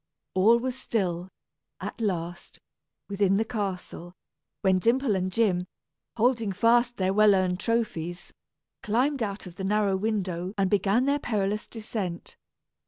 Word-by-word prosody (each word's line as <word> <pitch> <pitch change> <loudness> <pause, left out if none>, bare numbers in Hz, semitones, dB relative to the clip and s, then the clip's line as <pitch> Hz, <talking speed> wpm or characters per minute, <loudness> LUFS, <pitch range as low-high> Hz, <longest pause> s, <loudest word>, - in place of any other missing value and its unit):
All 210 +5 +5
was 250 +1 -3
still, 185 -8 -2 0.5
at - - -6
last, 175 -4 -3 0.5
within 200 -1 +2
the 220 - +1
castle, 190 -5 -5 0.5
when 190 -2 +3
Dimple 235 +2 +2
and 185 0 -1
Jim, 185 -4 +1 0.5
holding 230 -2 +2
fast 235 +4 +3
their 190 0 +1
well 210 0 +6
earned 185 -1 +1
trophies, 205 -7 -2 0.5
climbed 255 +6 +1
out 200 -2 -3
of 180 -1 -11
the 190 - -5
narrow 200 0 +2
window 190 -2 -2
and 195 -2 +1
began 205 +5 +2
their 285 +1 +2
perilous 210 -4 -1
descent. 210 -6 -5
200 Hz, 135 wpm, -27 LUFS, 185-230 Hz, 0.5 s, well